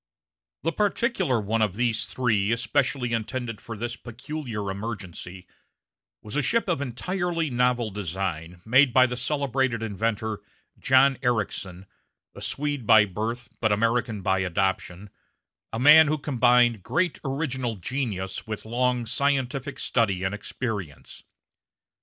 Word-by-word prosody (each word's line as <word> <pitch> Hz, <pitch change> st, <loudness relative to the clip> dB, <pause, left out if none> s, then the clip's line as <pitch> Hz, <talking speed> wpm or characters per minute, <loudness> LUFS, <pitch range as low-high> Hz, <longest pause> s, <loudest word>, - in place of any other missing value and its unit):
The 165 Hz, -, +1 dB
particular 200 Hz, -, +1 dB
one 110 Hz, +2 st, -1 dB
of 105 Hz, -4 st, +1 dB
these 115 Hz, -1 st, 0 dB
three 110 Hz, -5 st, 0 dB
especially 125 Hz, +1 st, 0 dB
intended 115 Hz, 0 st, -3 dB
for 115 Hz, -2 st, -7 dB
this 120 Hz, +2 st, -3 dB
peculiar 120 Hz, -4 st, -5 dB
emergency 95 Hz, -3 st, -7 dB, 0.8 s
was 105 Hz, -, -7 dB
a 150 Hz, -, +2 dB
ship 230 Hz, -, +1 dB
of 170 Hz, -6 st, 0 dB
entirely 165 Hz, +4 st, -2 dB
novel 125 Hz, -2 st, +1 dB
design, 90 Hz, -3 st, -4 dB
made 125 Hz, +2 st, +5 dB
by 130 Hz, +1 st, +7 dB
the 125 Hz, -1 st, -3 dB
celebrated 130 Hz, -2 st, 0 dB
inventor 110 Hz, 0 st, -2 dB, 0.4 s
John 135 Hz, 0 st, +4 dB
Ericsson, 100 Hz, -6 st, -2 dB, 0.5 s
a -, -, -11 dB
Swede 145 Hz, -5 st, -3 dB
by 110 Hz, -2 st, +7 dB
birth, 110 Hz, +5 st, -4 dB
but 110 Hz, -2 st, +1 dB
American 115 Hz, 0 st, 0 dB
by 95 Hz, +1 st, +2 dB
adoption 95 Hz, +1 st, -2 dB, 0.6 s
a 110 Hz, -, -3 dB
man 150 Hz, +5 st, +8 dB
who 155 Hz, +1 st, +1 dB
combined 120 Hz, -5 st, +3 dB
great 180 Hz, -, 0 dB
original 130 Hz, -4 st, -2 dB
genius 105 Hz, -2 st, -4 dB
with 110 Hz, -1 st, -5 dB
long 125 Hz, +1 st, 0 dB
scientific 135 Hz, +2 st, -1 dB
study 100 Hz, -6 st, 0 dB
and 95 Hz, +1 st, -1 dB
experience. 105 Hz, -, -6 dB
120 Hz, 130 wpm, -26 LUFS, 105-135 Hz, 0.8 s, man